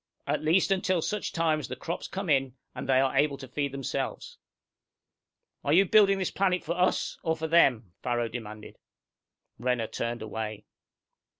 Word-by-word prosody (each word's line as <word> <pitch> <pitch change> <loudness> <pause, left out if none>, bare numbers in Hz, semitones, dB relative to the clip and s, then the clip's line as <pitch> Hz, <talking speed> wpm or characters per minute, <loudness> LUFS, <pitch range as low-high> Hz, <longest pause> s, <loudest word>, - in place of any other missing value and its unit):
At - - -1
least 165 +6 +3
until 185 -1 +2
such 210 -2 -2
time 160 -2 +1
as 150 - -6
the 130 - -5
crops 170 +5 -5
come 195 0 -5
in, 135 -4 +2 0.2
and - - -7
they 130 -1 +5
are 135 0 +1
able 145 -2 +2
to 135 - -9
feed 140 +2 -2
themselves!" 135 -2 -4 1.2
"Are 145 - +1
you 190 +4 +6
building 200 -1 +5
this 190 -2 -1
planet 185 -2 +1
for 170 +3 -2
us, 180 +1 0
or 160 -1 0
for 160 0 -3
them?" 125 - +3
Farrow 120 -1 0
demanded. 110 -2 -8 0.8
Renner 125 -1 0
turned 115 +1 -4
away. 110 -1 -5
140 Hz, 170 wpm, -28 LUFS, 120-175 Hz, 1.2 s, you